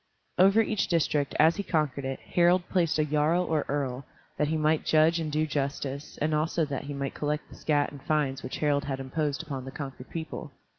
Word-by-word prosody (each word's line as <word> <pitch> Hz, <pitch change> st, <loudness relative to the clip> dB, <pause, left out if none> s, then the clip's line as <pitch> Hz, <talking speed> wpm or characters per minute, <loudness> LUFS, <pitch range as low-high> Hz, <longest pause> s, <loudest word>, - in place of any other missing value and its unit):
Over 195 Hz, +4 st, +6 dB
each 215 Hz, -1 st, 0 dB
district, 150 Hz, -4 st, +1 dB
as 160 Hz, +2 st, +5 dB
he -, -, 0 dB
conquered 150 Hz, -7 st, -1 dB
it, 135 Hz, 0 st, -3 dB
Harald 175 Hz, +1 st, +3 dB
placed 170 Hz, -5 st, +2 dB
a 155 Hz, -, +2 dB
jarl 150 Hz, +4 st, +2 dB
or 155 Hz, -4 st, 0 dB
earl, 135 Hz, -2 st, -2 dB, 0.3 s
that 150 Hz, -, +1 dB
he 160 Hz, +1 st, 0 dB
might 155 Hz, 0 st, +2 dB
judge 160 Hz, +2 st, +4 dB
and 155 Hz, -2 st, -3 dB
do 155 Hz, +1 st, +1 dB
justice, 140 Hz, -1 st, -3 dB
and 155 Hz, +1 st, 0 dB
also 155 Hz, +2 st, +1 dB
that 140 Hz, -1 st, -4 dB
he 145 Hz, -, -5 dB
might 140 Hz, 0 st, -3 dB
collect 150 Hz, 0 st, -2 dB
the -, -, -12 dB
scat 145 Hz, -2 st, +1 dB
and 140 Hz, -, -11 dB
fines 140 Hz, -3 st, 0 dB
which 130 Hz, -, -5 dB
Harald 145 Hz, -1 st, +1 dB
had 135 Hz, -2 st, -3 dB
imposed 145 Hz, +2 st, -2 dB
upon 140 Hz, -5 st, -5 dB
the 135 Hz, -, -7 dB
conquered 135 Hz, -2 st, -7 dB
people. 160 Hz, -2 st, -6 dB
150 Hz, 210 wpm, -28 LUFS, 140-160 Hz, 0.3 s, Over